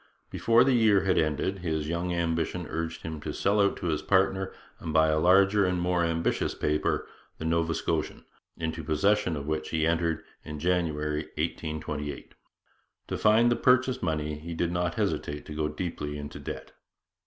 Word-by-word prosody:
Before 115 Hz, +1 st, +4 dB
the 135 Hz, 0 st, +3 dB
year 110 Hz, -5 st, +4 dB
had 95 Hz, -1 st, +2 dB
ended 80 Hz, +5 st, 0 dB
his 80 Hz, -4 st, -2 dB
young 85 Hz, +2 st, -2 dB
ambition 85 Hz, +1 st, -1 dB
urged 85 Hz, 0 st, -4 dB
him 80 Hz, -2 st, -5 dB
to 75 Hz, -, -4 dB
sell 100 Hz, +7 st, +2 dB
out 100 Hz, -, +2 dB
to -, -, -6 dB
his 80 Hz, -3 st, 0 dB
partner 95 Hz, 0 st, +2 dB, 0.3 s
and -, -, -8 dB
to 80 Hz, -, -2 dB
buy 80 Hz, 0 st, +5 dB
a 75 Hz, 0 st, +2 dB
larger 95 Hz, +4 st, +5 dB
and 90 Hz, -1 st, +1 dB
more 90 Hz, 0 st, +1 dB
ambitious 85 Hz, 0 st, 0 dB
paper, 75 Hz, 0 st, 0 dB, 0.3 s
the 80 Hz, -, -6 dB
Nova 80 Hz, 0 st, +1 dB
Scotian, -, -, -2 dB, 0.3 s
into 80 Hz, 0 st, -3 dB
possession 90 Hz, +4 st, +2 dB
of 70 Hz, -1 st, -5 dB
which 80 Hz, +1 st, -2 dB
he 80 Hz, -1 st, +1 dB
entered 85 Hz, -1 st, 0 dB, 0.2 s
in 75 Hz, -, -7 dB
January 75 Hz, -2 st, 0 dB
1828. 75 Hz, -2 st, -4 dB, 0.8 s
To -, -, -1 dB
find 110 Hz, +3 st, +5 dB
the -, -, +3 dB
purchase 130 Hz, +1 st, +3 dB
money 75 Hz, -2 st, -2 dB
he 85 Hz, +2 st, -6 dB
did 85 Hz, +1 st, 0 dB
not 85 Hz, 0 st, -1 dB
hesitate 75 Hz, 0 st, -2 dB
to 75 Hz, -, -7 dB
go 75 Hz, 0 st, -1 dB
deeply 75 Hz, -2 st, -4 dB
into 75 Hz, 0 st, -7 dB
debt. -, -, -7 dB
85 Hz, 175 wpm, -28 LUFS, 75-90 Hz, 0.8 s, buy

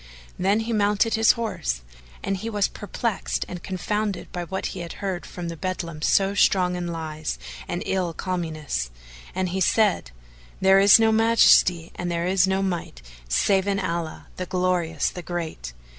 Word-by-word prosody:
"[FN#438] -, -, -19 dB
Then 195 Hz, +4 st, +2 dB
he 230 Hz, +1 st, -3 dB
mounted 210 Hz, +1 st, +2 dB
his 225 Hz, 0 st, +5 dB
horse, 65 Hz, -, -3 dB, 0.4 s
and 195 Hz, -, -1 dB
he 220 Hz, +4 st, -5 dB
was 205 Hz, -3 st, +1 dB
perplexed 215 Hz, +1 st, -3 dB
and 180 Hz, -1 st, -7 dB
confounded 205 Hz, +1 st, -3 dB
by 175 Hz, -1 st, -4 dB
what 190 Hz, +2 st, -4 dB
he 190 Hz, -, -7 dB
had 170 Hz, -1 st, -6 dB
heard 190 Hz, -3 st, -4 dB
from 175 Hz, -1 st, -6 dB
the 170 Hz, -, -5 dB
beldam 170 Hz, -3 st, -4 dB
so 195 Hz, +4 st, +3 dB
strong 185 Hz, -2 st, +3 dB
in 175 Hz, -1 st, -3 dB
lies 155 Hz, -, -4 dB, 0.3 s
and -, -, -3 dB
ill 185 Hz, -3 st, 0 dB
calumnies, 155 Hz, -, -3 dB, 0.5 s
and 185 Hz, -1 st, 0 dB
he 190 Hz, +2 st, -2 dB
said, 205 Hz, -, +2 dB, 0.5 s
"There 190 Hz, 0 st, +6 dB
is 200 Hz, 0 st, +8 dB
no 225 Hz, 0 st, +4 dB
Majesty 220 Hz, -6 st, +4 dB
and 175 Hz, -, -4 dB
there 170 Hz, 0 st, -1 dB
is 190 Hz, 0 st, +3 dB
no 190 Hz, 0 st, +1 dB
Might 170 Hz, -, -4 dB, 0.3 s
save 190 Hz, -, +2 dB
in 200 Hz, 0 st, +1 dB
Allah, 170 Hz, -3 st, -3 dB
the 185 Hz, -, -4 dB
Glorious, 180 Hz, -4 st, 0 dB
the 180 Hz, -, -7 dB
Great! 165 Hz, -, -5 dB
185 Hz, 175 wpm, -24 LUFS, 170-200 Hz, 0.5 s, is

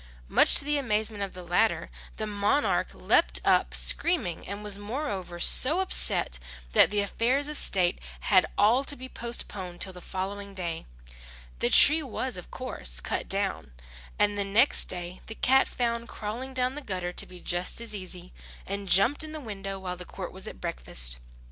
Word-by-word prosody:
Much -, -, +6 dB
to 280 Hz, -, +6 dB
the 295 Hz, 0 st, 0 dB
amazement 215 Hz, -4 st, -2 dB
of 195 Hz, -2 st, -4 dB
the 180 Hz, -, -9 dB
latter, 180 Hz, +6 st, 0 dB, 0.3 s
the 215 Hz, -, -3 dB
monarch 210 Hz, +7 st, 0 dB
leapt -, -, +1 dB
up -, -, +2 dB
screaming, 320 Hz, -, +1 dB
and 200 Hz, +1 st, -6 dB
was 205 Hz, -1 st, -1 dB
moreover 205 Hz, -, -5 dB
so 290 Hz, -, +5 dB
upset, 360 Hz, -, +2 dB, 0.3 s
that -, -, +5 dB
the 205 Hz, 0 st, +1 dB
affairs 250 Hz, +8 st, 0 dB
of 300 Hz, -, -6 dB
state 180 Hz, -9 st, +2 dB, 0.2 s
had 185 Hz, -3 st, +4 dB
all 235 Hz, +6 st, +4 dB
to 285 Hz, -, -6 dB
be 260 Hz, -1 st, -9 dB
postponed 200 Hz, -8 st, -5 dB
till 190 Hz, -, -3 dB
the 180 Hz, -, -12 dB
following 200 Hz, +2 st, -6 dB
day. 170 Hz, -3 st, -4 dB, 0.7 s
The -, -, +1 dB
tree 310 Hz, -, +8 dB
was, 260 Hz, -1 st, -4 dB
of 180 Hz, -, -9 dB
course, -, -, -5 dB
cut -, -, -4 dB
down; -, -, 0 dB, 0.4 s
and 205 Hz, 0 st, +1 dB
the -, -, +1 dB
next 215 Hz, +8 st, +3 dB
day 180 Hz, 0 st, -3 dB
the 220 Hz, -, -8 dB
cat 265 Hz, +3 st, +3 dB
found 235 Hz, -1 st, -2 dB
crawling 240 Hz, +5 st, -6 dB
down 255 Hz, 0 st, +1 dB
the 295 Hz, -, -7 dB
gutter 180 Hz, -7 st, -4 dB
to -, -, -1 dB
be 180 Hz, -1 st, -11 dB
just 175 Hz, +3 st, -2 dB
as 230 Hz, -2 st, -1 dB
easy, 185 Hz, -2 st, -7 dB, 0.3 s
and 200 Hz, 0 st, -5 dB
jumped 200 Hz, -, +4 dB
in 310 Hz, 0 st, -8 dB
the 310 Hz, -, -6 dB
window 195 Hz, -6 st, -6 dB
while 180 Hz, -1 st, -6 dB
the 180 Hz, -, -8 dB
court -, -, -8 dB
was -, -, -6 dB
at -, -, -9 dB
breakfast. -, -, 0 dB
205 Hz, 180 wpm, -27 LUFS, 180-250 Hz, 0.7 s, tree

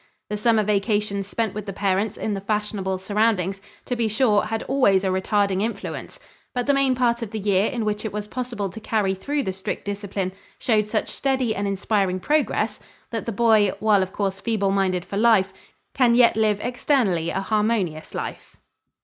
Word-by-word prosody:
The 210 Hz, -, -1 dB
summer 220 Hz, 0 st, +3 dB
vacations 205 Hz, -1 st, 0 dB
spent 220 Hz, -1 st, -2 dB
with 210 Hz, -1 st, -6 dB
the 195 Hz, -, -4 dB
parents 200 Hz, +2 st, 0 dB
in 215 Hz, -, -2 dB
the 195 Hz, -, -3 dB
fashionable 200 Hz, -2 st, -2 dB
surroundings, 195 Hz, -1 st, 0 dB, 0.2 s
to 250 Hz, -, -2 dB
be 230 Hz, -2 st, +1 dB
sure, 215 Hz, -1 st, +2 dB
had 225 Hz, 0 st, -3 dB
always 200 Hz, -8 st, +3 dB
a 190 Hz, -, +1 dB
retarding 195 Hz, +1 st, +1 dB
influence, 225 Hz, +2 st, -4 dB, 0.4 s
but 245 Hz, -1 st, 0 dB
the 280 Hz, -, +3 dB
main 275 Hz, -2 st, +3 dB
part 240 Hz, -1 st, +1 dB
of 230 Hz, -, -4 dB
the 220 Hz, -, -5 dB
year 200 Hz, 0 st, +2 dB
in 235 Hz, -3 st, -2 dB
which 210 Hz, 0 st, -1 dB
it 220 Hz, -, -3 dB
was 210 Hz, +1 st, -4 dB
possible 235 Hz, -2 st, -4 dB
to 220 Hz, -, -8 dB
carry 210 Hz, -3 st, 0 dB
through 280 Hz, +9 st, -2 dB
the 190 Hz, -, -2 dB
strict 190 Hz, 0 st, -5 dB
discipline 200 Hz, -2 st, -3 dB, 0.3 s
showed 215 Hz, -4 st, +1 dB
such 215 Hz, 0 st, -1 dB
steady 260 Hz, -5 st, 0 dB
and 200 Hz, +1 st, -1 dB
inspiring 195 Hz, -1 st, 0 dB
progress 300 Hz, +9 st, 0 dB, 0.3 s
that 230 Hz, -1 st, -4 dB
the -, -, 0 dB
boy, 215 Hz, -2 st, +4 dB
while 210 Hz, -2 st, +4 dB
of 185 Hz, 0 st, -2 dB
course 195 Hz, -1 st, -2 dB
feeble 205 Hz, -4 st, 0 dB
minded 190 Hz, -2 st, 0 dB
for 200 Hz, +2 st, -5 dB
life, 210 Hz, -4 st, +4 dB, 0.4 s
can 245 Hz, -3 st, +4 dB
yet 240 Hz, -1 st, +5 dB
live 215 Hz, -2 st, +2 dB
externally 235 Hz, -, +1 dB
a 190 Hz, -, -1 dB
harmonious 210 Hz, -7 st, -1 dB
life. -, -, -6 dB
210 Hz, 190 wpm, -23 LUFS, 195-230 Hz, 0.4 s, yet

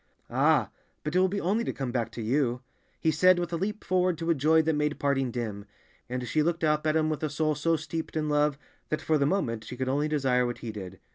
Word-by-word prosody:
"Ah, -, -, +3 dB, 0.3 s
but 150 Hz, +3 st, -3 dB
it -, -, +5 dB
will 185 Hz, -, +4 dB
be 200 Hz, +2 st, -2 dB
only 205 Hz, +6 st, +1 dB
to -, -, -2 dB
come 135 Hz, -3 st, -4 dB
back 115 Hz, -2 st, -1 dB
to 115 Hz, -, -5 dB
you," 125 Hz, +1 st, 0 dB, 0.4 s
he 160 Hz, -, +2 dB
said 185 Hz, +4 st, +5 dB
with 175 Hz, 0 st, -2 dB
a -, -, +2 dB
leap 205 Hz, +5 st, -3 dB
forward 180 Hz, -1 st, +1 dB
to 165 Hz, +1 st, 0 dB
a -, -, +5 dB
joy 155 Hz, +2 st, +3 dB
that 160 Hz, +1 st, +1 dB
made 150 Hz, 0 st, 0 dB
parting 135 Hz, -2 st, +1 dB
dim, 110 Hz, -4 st, -4 dB, 0.4 s
and 125 Hz, 0 st, -3 dB
she 155 Hz, +7 st, +1 dB
looked 170 Hz, +2 st, 0 dB
up 150 Hz, 0 st, +2 dB
at 155 Hz, -, +2 dB
him 155 Hz, -1 st, +2 dB
with 155 Hz, -2 st, -2 dB
a 155 Hz, -, -1 dB
soul 155 Hz, +1 st, 0 dB
so 165 Hz, +3 st, +1 dB
steeped 160 Hz, 0 st, -4 dB
in 155 Hz, -1 st, 0 dB
love 150 Hz, -1 st, +2 dB, 0.3 s
that 155 Hz, -, 0 dB
for 155 Hz, 0 st, +1 dB
the 140 Hz, -, +3 dB
moment 115 Hz, -, -1 dB
she 125 Hz, -, -8 dB
could 130 Hz, 0 st, -2 dB
only 145 Hz, +3 st, +1 dB
desire 135 Hz, -5 st, +2 dB
what 120 Hz, -, -4 dB
he 115 Hz, -, -3 dB
did. 95 Hz, -3 st, -8 dB
150 Hz, 260 wpm, -28 LUFS, 125-160 Hz, 0.4 s, it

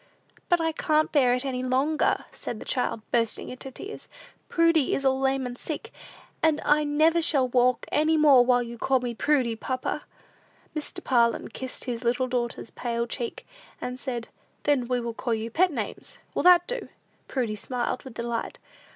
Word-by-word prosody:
"But 350 Hz, -2 st, +4 dB
I 325 Hz, 0 st, +1 dB
can't 310 Hz, -1 st, +1 dB
bear 255 Hz, -5 st, +4 dB
it 250 Hz, +2 st, -3 dB
any 255 Hz, -2 st, -2 dB
longer," 265 Hz, +5 st, +1 dB
said 235 Hz, -, -6 dB
the -, -, -9 dB
child, 230 Hz, -3 st, -1 dB
bursting 230 Hz, -2 st, 0 dB
into 255 Hz, +1 st, -6 dB
tears. 400 Hz, -, -9 dB, 0.4 s
"Prudy 330 Hz, -4 st, +3 dB
is 275 Hz, -, -3 dB
all 265 Hz, 0 st, +3 dB
lame 270 Hz, 0 st, +1 dB
and 245 Hz, -1 st, -5 dB
sick, 320 Hz, -, -6 dB, 0.5 s
and 315 Hz, -2 st, +3 dB
I 300 Hz, +1 st, +4 dB
never 310 Hz, +3 st, +3 dB
shall 275 Hz, -5 st, +3 dB
walk 250 Hz, 0 st, +2 dB
any 315 Hz, +1 st, +3 dB
more 285 Hz, -5 st, +7 dB
while 245 Hz, 0 st, +3 dB
you 235 Hz, 0 st, -8 dB
call 265 Hz, +1 st, +2 dB
me 245 Hz, -1 st, -3 dB
Prudy, 250 Hz, -2 st, +1 dB
papa." 255 Hz, +3 st, -3 dB, 0.7 s
Mr. 305 Hz, -, -4 dB
Parlin 235 Hz, -3 st, +2 dB
kissed 260 Hz, -1 st, -6 dB
his 240 Hz, -1 st, -4 dB
little 245 Hz, +2 st, +1 dB
daughters's 240 Hz, -2 st, -3 dB
pale 235 Hz, -1 st, -2 dB
cheek, 235 Hz, 0 st, -5 dB, 0.3 s
and 250 Hz, +1 st, -5 dB
said, 240 Hz, -4 st, -4 dB, 0.3 s
"Then 285 Hz, -4 st, +2 dB
we 250 Hz, 0 st, +1 dB
will 235 Hz, -1 st, -4 dB
call 235 Hz, 0 st, -1 dB
you 225 Hz, +1 st, -4 dB
pet 360 Hz, +7 st, +3 dB
names; -, -, -5 dB, 0.2 s
will -, -, 0 dB
that 355 Hz, -1 st, +7 dB
do?" -, -, -4 dB, 0.4 s
Prudy 240 Hz, -5 st, -1 dB
smiled 240 Hz, +3 st, -3 dB
with 260 Hz, -5 st, -11 dB
delight. 235 Hz, 0 st, -3 dB
255 Hz, 175 wpm, -26 LUFS, 240-300 Hz, 0.7 s, more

